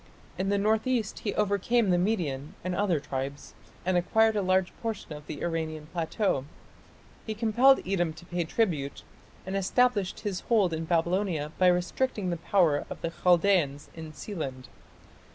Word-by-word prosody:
In 195 +1 -1
the 200 - +2
north 215 +3 +1
east 235 -5 -1
he 205 - -3
overcame 210 +1 +2
the 175 - +4
Median 160 -8 -1
and 185 0 -2
other 180 -4 +1
tribes, 135 0 -5 0.3
and 185 0 +1
acquired 220 +5 +3
a 205 - +1
large 185 -1 +1
portion 225 -8 -4
of 150 0 -10
the 150 - -6
Iranian 160 -2 -3
plateau; 165 -3 0 0.8
he 220 - -3
compelled 240 +5 +4
Edom 175 -4 +1
to 160 +2 -13
pay 175 0 -2
tribute, 160 -8 -1 0.4
and 190 +1 -4
established 200 0 +1
his 195 -3 -2
hold 205 -7 +3
in 160 0 -3
Babylonia 170 -2 0
by 185 - +5
restricting 180 +3 +1
the 170 - -2
power 165 -3 +2
of - - -7
the 165 - -2
Chaldaeans 175 -5 +2
in 160 -1 -8
Sealand. 135 - -6
180 Hz, 160 wpm, -28 LUFS, 160-205 Hz, 0.8 s, by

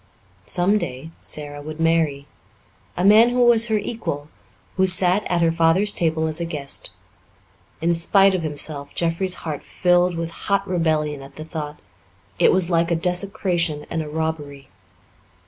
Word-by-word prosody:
Some 195 +4 +1
day 145 -2 -6
Sara 145 -1 -7
would 155 +2 -8
marry 165 -4 +1 0.7
a 180 - 0
man 220 +4 +7
who 245 0 +2
was 235 -1 +4
her 220 -1 +1
equal, 155 -10 -5 0.5
who 190 0 +2
sat 185 +2 +5
at 175 -1 0
her 165 - +3
father's 165 +5 +2
table 160 -1 0
as 160 +1 -1
a - - -1
guest. 145 -4 -5 0.9
In 170 +1 +2
spite 195 +4 +4
of 185 - -1
himself, 145 -2 -3
Jeffrey's 175 +2 -1
heart 150 -3 -4
filled 180 0 +1
with 165 0 -4
hot 200 +3 -2
rebellion 155 -5 -1
at 135 - -13
the 155 - -8
thought; 150 -2 -6 0.6
it - - +5
was 185 -1 +4
like 170 0 +2
a 170 - +1
desecration 175 -3 -1
and 165 - -1
a 150 - -6
robbery. 150 -3 -5
165 Hz, 160 wpm, -21 LUFS, 155-185 Hz, 0.9 s, man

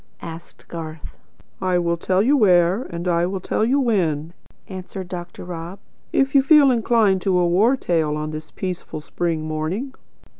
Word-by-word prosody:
asked 165 0 -10
Garth. 160 -2 -7 0.5
"I 185 -1 +1
will 170 -1 +1
tell 185 +3 +1
you 275 +6 +4
where, 185 -1 +3
and 170 +1 -5
I 170 0 +2
will 190 +1 -3
tell 200 - -1
you 260 +5 +2
when," 170 - 0 0.3
answered 185 0 -7
Dr. 175 -1 -7
Rob, 175 +1 -7 0.3
"if 270 0 +1
you 275 - +6
feel 285 -1 +6
inclined 225 -5 +2
for 185 -3 +2
a 175 - +3
war 205 +10 +3
tale 160 -8 0
on 155 0 -4
this 155 0 -7
peaceful 180 -4 -5
spring 165 0 -2
morning." 165 - -3
180 Hz, 165 wpm, -22 LUFS, 165-215 Hz, 0.5 s, you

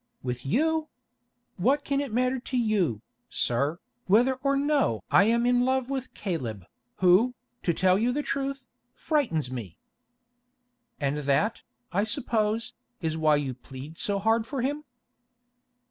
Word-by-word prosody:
"With 125 0 -4
you! 315 - +1 0.7
What 285 +2 +2
can 280 0 0
it 280 -4 -4
matter 255 +3 +1
to 255 +1 -3
you, 195 - +1 0.3
sir, 140 +7 0 0.3
whether 235 +7 +5
or 275 0 +2
no 280 - +1
I 200 - +6
am 235 +2 +2
in 245 0 +4
love 260 0 0
with 265 -2 -4
Caleb, 120 - -4 0.3
who, 190 +8 +4 0.3
to 175 - +1
tell 185 +3 +3
you 235 +3 +2
the 295 +4 -1
truth, 275 -1 -3 0.3
frightens 225 - 0
me?" 110 -10 -6 1.2
"And 140 0 0
that, 145 +9 +1 0.3
I 200 +3 +2
suppose, 220 -1 -1 0.3
is 160 -3 -2
why 155 -1 +4
you 140 -3 -1
plead 135 +5 -10
so 200 -1 -1
hard 225 +3 +2
for 265 -1 -3
him?" 290 +3 -2
220 Hz, 145 wpm, -27 LUFS, -, 1.2 s, I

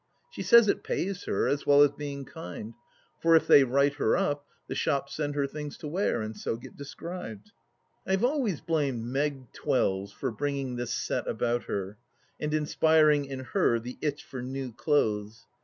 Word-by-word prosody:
She - - -7
says 235 -2 +7
it - - +1
pays 190 0 -2
her, - - 0
as 140 0 -1
well 145 0 +7
as 145 - +4
being 140 -1 -6
kind; 125 -9 -8 0.5
for 165 0 +5
if 160 - +4
they 140 - +8
write 140 +2 +2
her - - +2
up, 145 -7 -1 0.2
the - - -5
shops 140 -2 -1
send 145 -1 -2
her 140 -1 +1
things 150 +1 -6
to 155 - -7
wear, 155 - 0
and 110 0 -5
so - - -3
get 120 - -12
described. 140 - -8 0.6
I 190 - +1
have 195 +5 +3
always 250 - 0
blamed 140 -8 0
Meg 135 0 -2
Twells 95 +1 0
for 130 +5 -3
bringing 140 0 -2
this 120 -1 -3
set - - -2
about 120 0 -1
her 100 +1 -4 0.4
and 150 - -2
inspiring 155 -1 +3
in 135 -1 -6
her 175 -12 +3
the 125 +2 -8
itch 150 -1 -2
for 130 - -7
new 130 -1 -5
clothes. 110 -5 0
140 Hz, 185 wpm, -28 LUFS, 120-155 Hz, 0.6 s, they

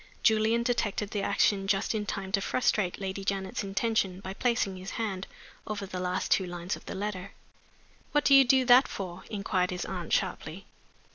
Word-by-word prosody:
Julian 220 +1 +3
detected 215 -4 -1
the 205 - -1
action 200 0 +2
just 195 +3 +1
in 210 -2 -2
time 195 -1 -4
to 195 - +2
frustrate 205 -4 0
Lady 195 0 -4
Janet's 195 0 -2
intention 195 -1 0
by 190 -1 -6
placing 230 -4 0
his 185 +1 -7
hand 195 -5 -3 0.4
over 205 -2 -3
the 185 -1 -6
last 180 +1 -2
two 190 - +3
lines 175 +1 -4
of - - -13
the - - -5
letter. 200 -1 -4 0.8
"What 295 -1 +2
do 280 - +5
you 275 0 +9
do 260 0 +4
that 250 +2 +7
for?" 185 -2 -6
inquired 195 -3 0
his 180 -1 -3
aunt, 180 -3 -5
sharply. - - -1
195 Hz, 185 wpm, -29 LUFS, 190-220 Hz, 0.8 s, you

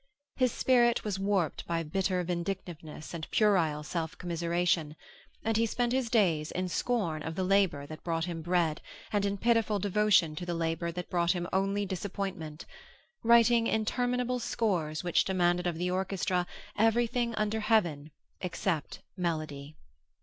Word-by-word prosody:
His 255 -2 +2
spirit 240 -1 +3
was 205 -3 -2
warped 195 -5 0
by 165 -1 -1
bitter 180 +3 0
vindictiveness 170 -3 -5
and 165 -2 -6
puerile 170 -8 +2
self 160 0 -4
commiseration, 170 -2 0 0.5
and 225 -1 +2
he 230 0 +3
spent 240 +2 0
his 260 -3 0
days 170 -9 +2
in 185 0 -2
scorn 180 -7 -1
of 160 +1 -5
the 185 - -1
labor 185 -7 +2
that 155 +1 -10
brought 165 -1 -1
him 170 -2 -4
bread 170 -2 +1 0.3
and 205 -1 +2
in 200 0 -2
pitiful 225 -1 +2
devotion 200 -5 +3
to 180 - -4
the 175 -1 -2
labor 165 +1 -1
that 180 +1 -6
brought 175 0 +2
him 175 -1 -3
only 195 +2 +1
disappointment, 190 -4 -5 0.6
writing 235 0 +5
interminable 245 +3 0
scores 180 -10 -1
which 175 -1 +3
demanded 180 -1 +1
of 170 -2 -2
the 180 +1 -1
orchestra 185 -1 0 0.3
everything 235 +2 +2
under 215 +1 0
heaven 175 -10 +1 0.3
except 175 -3 -2
melody. 155 -5 -3
180 Hz, 150 wpm, -30 LUFS, 165-215 Hz, 0.6 s, writing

